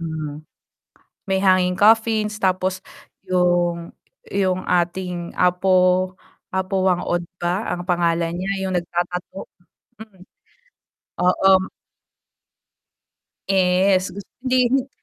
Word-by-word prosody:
Mm, 155 -2 -6 0.8
may 190 -1 0
hanging 185 -2 +3
coffins, 215 +1 +3
tapos 185 -1 -1 0.4
'yong 175 -2 0 0.3
'yong 185 -2 0
ating 175 0 -1
Apo 185 0 +2 0.4
Apo 190 0 -1
Wang 180 -2 +2
Od 175 0 -1 0.2
ba 180 +5 -1
ang 175 +1 -5
pangalan 170 -1 0
niya, 190 +2 -2
'yong 190 -1 -1
nag-tatattoo? 175 +2 -4 0.5
Hmm. 205 -4 -14 1.0
Oo. 190 +1 +3 1.8
Yes. 185 0 +2
Gus 200 - -8 0.2
hindi 255 -1 +2
rin 270 0 +1
185 Hz, 95 wpm, -21 LUFS, 175-190 Hz, 1.8 s, hanging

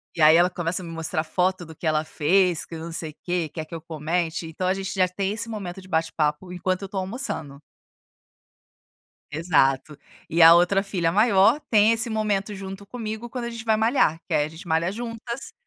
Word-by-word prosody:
e 165 - -2
aí 155 +1 +8
ela 175 +1 +5
começa 175 +1 -3
a - - -8
me 165 - -7
mostrar 165 -1 -1
foto 180 +1 0
do 160 0 -12
que 160 - -4
ela 155 0 +2
fez, 175 +2 +2
que 165 - -7
não 165 +1 -7
sei 160 -1 -4
o - - -25
quê, 175 -3 -1
quer 160 -1 -5
que 160 - -15
eu 160 - -7
comente, 165 +1 -2
então 180 +3 -3
a 185 - +3
gente 195 0 -4
já 185 -2 +3
tem 190 +2 -2
esse 230 +1 -2
momento 190 -4 -6
de 185 - -15
bate-papo 160 0 -1
enquanto 185 +2 -2
eu 195 - -6
tô 200 - -6
almoçando. 185 - -4 1.7
Exato. 150 -3 +1 0.3
E 165 +1 +2
a 165 +1 +10
outra 180 +3 +3
filha 180 -4 0
maior 215 - +4
tem 215 0 +5
esse 230 +1 -1
momento 210 -2 -1
junto 195 +1 -8
comigo 225 +1 -6
quando 245 -1 -5
a - - -3
gente 230 -1 -7
vai 220 -1 +2
malhar, 220 - +2
que 170 - -3
aí 150 -1 +3
a - - -2
gente 160 +2 -12
malha 165 +3 +1
juntas. 235 +2 -6
180 Hz, 215 wpm, -24 LUFS, 160-205 Hz, 1.7 s, a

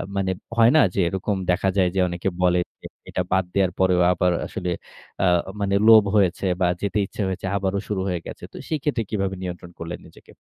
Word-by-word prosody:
মানে 95 -1 0 0.3
হয় 115 +1 +6
না 155 - +7
যে - - -2
এরকম 95 +3 -2 0.2
দেখা 95 +2 +1
যায় 90 -2 +4
যে - - +1
অনেকে 85 +2 -2
বলে 90 0 +3 0.2
যে - - -14 0.2
এটা - - -1
বাদ 95 0 +3
দেওয়ার 95 -2 +2
পরেও 90 -1 +3
আবার 90 +1 +1 0.2
আসলে 90 - -4 0.5
আ - - +4 0.3
মানে 100 -1 0
লোভ 110 -2 +9
হয়েছে 100 -2 +2 0.2
বা 90 - +4
যেতে 100 +1 -1
ইচ্ছা 100 - -7
হয়েছে, 95 0 -4
আবারও 100 0 -1
শুরু 100 -3 -2
হয়ে 90 -2 -1
গেছে। - - -9
তো - - -11
সেক্ষেত্রে 150 -6 -1
কিভাবে 95 -3 -1
নিয়ন্ত্রণ 90 -1 -6
করলেন 85 +1 -6
নিজেকে? - - -18
95 Hz, 200 wpm, -23 LUFS, 90-100 Hz, 0.5 s, লোভ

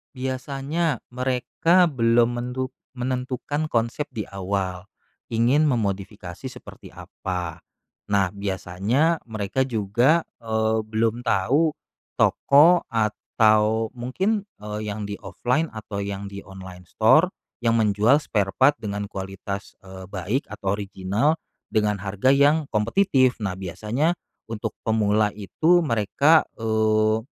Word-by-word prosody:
Biasanya 135 +3 -2
mereka 130 +8 +2
belum 120 -2 +2
mentu 125 +2 -3 0.2
menentukan 130 +4 -2
konsep 120 +1 -1
di 110 - -5
awal, 95 -1 -3 0.5
ingin 125 +7 +3
memodifikasi 100 - -3
seperti 130 - -10
apa. 90 -3 -6 0.5
Nah 100 -2 +3
biasanya 100 - 0
mereka 110 +2 -1
juga, 120 +7 +2 0.2
eee, 110 -1 0
belum 115 +2 -1
tahu 140 +12 +2 0.4
toko 160 +6 +5
atau 110 0 +2
mungkin, 190 - -1 0.2
eee, 105 0 -5
yang 105 0 -4
di 100 - -4
offline 125 +7 -1
atau 110 -2 -7
yang 100 0 -4
di 100 0 -9
online 95 -2 -11
store 155 - +4 0.3
yang 115 - +4
menjual 110 +8 +3
spare 100 -6 -1
part 145 +7 +4
dengan 105 -2 -4
kualitas, 95 +1 -6
eee, 95 0 -10
baik 100 +8 -2
atau 100 +1 -3
original 105 - -1 0.3
dengan 105 -1 +2
harga 100 +5 0
yang 145 +2 +4
kompetitif, 130 - +2
nah 95 -3 -2
biasanya 110 - -1 0.3
untuk 110 -1 -5
pemula 105 -1 +2
itu 160 - +2
mereka, 140 +5 +3 0.2
eee 110 0 +2
110 Hz, 115 wpm, -24 LUFS, 100-130 Hz, 0.5 s, toko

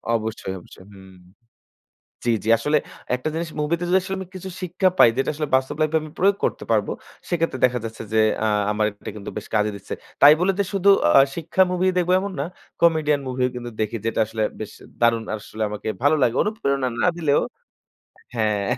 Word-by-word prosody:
অবশ্যই, 110 -3 -3
অবশ্যই। 95 +2 -16
হুম। 95 -1 -15 1.1
জি, 120 - +3
জি, 110 - -2
আসলে 150 +6 +1 0.4
একটা 125 +5 -3
জিনিস 165 0 -3
movie 150 +3 +1
তে 175 - -3
যদি 185 - +5
আসলে 190 +1 -4
আমি 190 - -6
কিছু 190 +1 -6
শিক্ষা 185 +1 +1
পাই 115 - +8
যেটা 135 - +1
আসলে 150 0 -3
বাস্তব 130 +2 0
life 155 - +2
এ - - +6
আমি 155 -1 -9
প্রয়োগ 200 +2 +4
করতে - - -2
পারব - - +2 0.4
সেক্ষেত্রে 165 -6 0
দেখা 125 -1 0
যাচ্ছে 115 0 -7
যে 110 - +4 0.3
আ - - +3 0.2
আমার 105 0 +1 0.2
এটা - - -6
কিন্তু 100 -2 -7
বেশ 105 - -6
কাজে 105 0 +2
দিচ্ছে। 100 - -7 0.3
তাই 145 +1 +10
বলে 185 +2 +3
যে - - +4
শুধু 195 0 +3 0.3
আ - - +9
শিক্ষা 170 +3 +2
movie 180 +1 +2
ই - - -8
দেখব 180 0 +1
এমন 200 +1 -4
না। 140 - 0 0.4
comedian 155 -3 +3
movie 125 0 0
ও - - -3
কিন্তু 120 -1 -5
দেখি 110 +2 -1
যেটা 115 - -1
আসলে 110 0 -3 0.2
বেশ 110 - -6 0.3
দারুণ 115 -1 +3
আসলে 110 +1 -6
আমাকে 105 +1 -6 0.2
ভালো 145 +2 +5
লাগে। 120 0 +3
অনুপ্রেরণা 140 - -1 0.2
না - - +4
দিলেও 150 -4 +2 0.9
হ্যাঁ। 105 -3 0
140 Hz, 205 wpm, -23 LUFS, 110-170 Hz, 1.1 s, তাই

